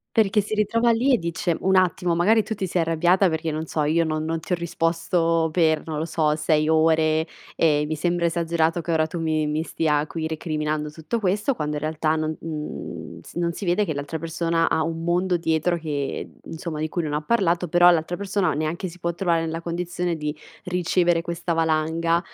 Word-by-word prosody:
perché 215 -2 +4
si 210 +2 -3
ritrova 230 +3 +2
lì 250 +4 +3
e 240 - +3
dice: 170 0 -1
"Un 190 0 +2
attimo 180 -2 +2
magari 215 +6 +4
tu 220 +1 -4
ti 190 - -2
sei 180 0 0
arrabbiata 175 +4 +3
perché 160 0 -2
non 155 +1 -3
so 155 -1 -1
io 165 +3 +2
non 155 -1 -2
non 165 0 -2
ti - - -13
ho 180 - +3
risposto 165 0 0
per 160 -2 +2
non 155 -2 -3
lo 155 - -1
so, 155 -2 +1
6 155 0 +1
ore 160 0 +3 0.3
e 150 -2 +3
mi 155 - -2
sembra 175 +2 0
esagerato 165 0 0
che 170 - -5
ora 160 -1 +2
tu 165 +1 -5
mi 155 -1 0
mi 150 +1 -1
stia 150 -3 0
qui 160 -1 -4
recriminando 155 -1 -2
tutto 165 +9 -4
questo" 210 +8 +1
quando 150 -6 -3
in 150 - -4
realtà 155 0 0
non, 155 0 -2
mhmm, 155 -2 -6
s - - -14
non 170 0 0
si 200 - -6
vede 185 +4 +2
che 155 - -3
l'altra 145 +3 -4
persona 165 0 0
ha 160 - +1
un 165 0 -3
mondo 180 +1 +1
dietro 165 +1 +1
che, 145 -4 -3
ehm, - - -7 0.2
insomma 160 -1 -5
di 155 - -1
cui 170 +1 -2
non 150 - -3
ha 150 +1 -1
parlato 180 -3 +1
però 175 +2 +6
l'altra 175 0 +2
persona 200 -1 0
neanche 155 +5 -2
si 180 +1 -12
può 170 0 -2
trovare 170 -2 +1
nella 165 0 -3
condizione 175 0 -2
di 150 -1 -4 0.3
ricevere 175 -2 +1
questa 170 0 -3
valanga, 165 +1 +1
165 Hz, 210 wpm, -24 LUFS, 155-175 Hz, 0.3 s, però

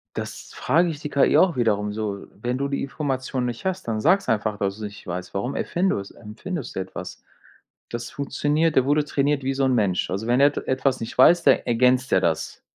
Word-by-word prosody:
Das - - -6
frage 170 +3 +2
ich 150 -3 -5
die 150 - -5
KI 140 -1 +3
auch 185 -3 +4
wiederum 105 -4 0
so, 105 -2 -4
wenn 120 +4 -3
du 140 +1 -1
die 140 0 -2
Information 135 -2 -2
nicht 120 -2 -4
hast, 190 -6 -2
dann 110 -1 -1
sag's 185 - +3
einfach, 105 -1 0
dass 100 -1 -1
du's 110 - -9
nicht 105 0 -8
weißt. 90 +1 -5
Warum 110 +8 -2
erfindus 170 - -1
erfindest 140 - -7
du - - -1
etwas? 95 -1 -8 0.7
Das 120 0 -5
funktioniert, 145 +3 0
der 130 - +5
wurde 145 +1 +2
trainiert 140 -1 0
wie 135 +1 0
so 135 0 +1
'n 130 - +2
Mensch. 100 -6 +1
Also, 100 +5 -3
wenn 120 +3 +3
er 140 - +8
et 145 - -3
etwas 130 0 +1
nicht 115 - -6
weiß, 170 +7 +6
de - - +5
ergänzt 125 +2 +2
der 95 - +5
das. 80 -3 -1
130 Hz, 215 wpm, -23 LUFS, 105-145 Hz, 0.7 s, er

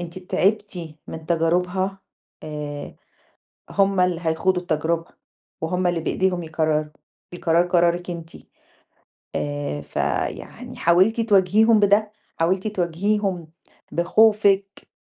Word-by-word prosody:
أنتِ 175 +1 -7
تعبتِ 185 -3 -1
من 160 -1 -8
تجاربها 180 +3 0 0.4
آآ، 150 -1 -6 0.7
هُم 195 -1 +2
اللي 180 -2 +1
هيخوضوا 180 +3 +1
التجربة، 165 0 -1 0.6
وهُم 180 +3 0
اللي 175 -1 0
بإيديهم 180 +1 0
يقرروا، 155 -1 0 0.5
القرار 170 0 +2
قرارِك 175 0 +1
أنتِ 165 -1 -7 1.1
آآ، 145 - -3
فيعني - - -4
حاولتِ 185 +7 +3
تواجهيهم 215 +1 +4
بده، 205 +1 +3 0.3
حاولتِ 185 +5 +1
تواجهيهم 190 -1 -1 0.5
بخوفِك؟ 200 +1 +3
180 Hz, 95 wpm, -23 LUFS, 165-195 Hz, 1.1 s, تواجهيهم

